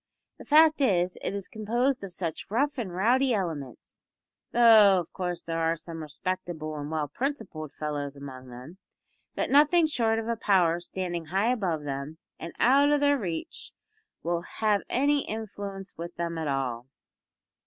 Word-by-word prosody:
The - - -11
fact 310 0 +5
is, 180 -8 +2
it - - -3
is 200 -2 -5
composed 240 +4 -1
of 195 - -6
such 170 -3 -4
rough 275 +6 0
and 205 -6 -3
rowdy 240 +7 +2
elements 155 - -5 0.5
though 220 -5 +7
of 170 - -7
course 180 -2 -3
there 165 0 -3
are 165 0 +1
some 165 0 -8
respectable 160 0 -4
and 145 0 -5
well 155 -2 -1
principled 205 - -4
fellows 145 -2 -4
among 130 -2 -10
them 130 +10 -11 0.6
that - - -1
nothing 300 +4 +5
short 230 -7 +1
of 225 0 -3
a 235 - 0
power 180 -6 +2
standing 175 -1 -4
high 195 +8 +1
above 180 -11 -1
them 140 +2 -5 0.2
and 165 - -7
out 280 +4 +5
o' 295 - +4
their 285 -1 +3
reach 170 -6 -5 0.5
will 170 +1 -1
have 210 +2 0
any 285 +3 +2
influence 200 -3 -6
with 170 +1 -7
them 170 0 -3
at 160 - -3
all. 130 -3 -2
185 Hz, 165 wpm, -27 LUFS, 160-230 Hz, 0.6 s, though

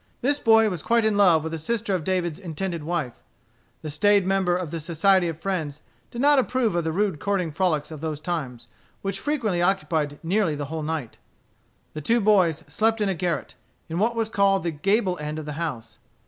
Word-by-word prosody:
This 285 +3 +1
boy 225 -2 +5
was 180 -6 -3
quite 230 -1 +2
in 215 -1 +2
love 180 -6 +5
with 160 0 -4
a 165 - -3
sister 220 +4 -1
of 180 -4 -1
David's 175 -2 -1
intended 170 -2 -4
wife. 155 -6 -3 0.6
The 155 - -4
staid 205 +4 +3
member 190 -2 +2
of 180 -4 -5
the 165 - -3
Society 175 +3 +2
of 165 -1 -5
Friends 160 -6 -3 0.3
did 235 - -8
not 285 +1 +5
approve 250 -4 +1
of 170 -1 0
the 160 - -1
rude 190 -2 0
courting 195 -5 -1
frolics 155 -2 0
of 155 -2 -8
those 155 -2 -3
times, 145 -8 -4 0.4
which 195 0 -2
frequently 225 -10 -1
occupied 165 -6 0
nearly 175 -2 +1
the 145 0 -4
whole 160 - -3
night. 155 -6 -4 0.7
The 155 - -5
two 230 +10 +2
boys 190 -7 +3
slept 225 +1 +1
in 205 -2 +1
a - - +1
garret, 175 -1 -2 0.4
in 165 +2 -2
what 230 +3 +1
was 225 -1 0
called 195 -3 +2
the 170 - -1
gable 185 +3 0
end 150 +1 -4
of 155 - -5
the 150 - -5
house. 115 -9 -5
180 Hz, 205 wpm, -24 LUFS, 155-205 Hz, 0.7 s, boy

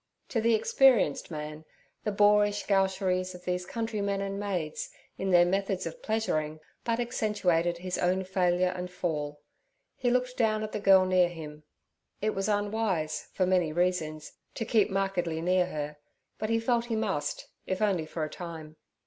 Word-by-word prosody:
To 230 - 0
the 230 0 +4
experienced 260 - +3
man, 150 -1 -6 0.4
the 210 - +1
boorish 205 0 +3
gaucheries 190 -2 +1
of 180 0 -13
these 180 0 -2
countrymen 210 -4 -2
and 195 0 -3
maids 180 -7 -3 0.3
in 190 - -1
their 175 -1 +6
methods 195 +1 0
of 165 - -6
pleasuring, 155 -9 -1 0.2
but 230 0 0
accentuated 195 -8 +1
his 180 +1 -3
own 185 +1 +1
failure 180 -1 +1
and 180 0 -4
fall; 150 -5 -3 0.5
he 245 - 0
looked 250 0 0
down 215 -2 +2
at 215 - -4
the - - -3
girl 195 -2 +6
near 185 -1 +4
him. 155 -3 -9 0.6
It 215 +1 0
was 195 +2 -1
unwise, 205 -6 -1
for 185 - +2
many 180 -3 +2
reasons, 160 -3 -1 0.2
to 225 - -3
keep 215 -1 +3
markedly 190 -4 -1
near 180 +2 +2
her, 150 -3 -5 0.4
but 215 - -2
he 230 0 +2
felt 235 0 +1
he 235 -2 -2
must, 195 -10 -2 0.2
if 185 - -1
only 190 -7 +1
for 160 0 -3
a - - -1
time. 160 -3 -8
185 Hz, 165 wpm, -29 LUFS, 170-210 Hz, 0.6 s, their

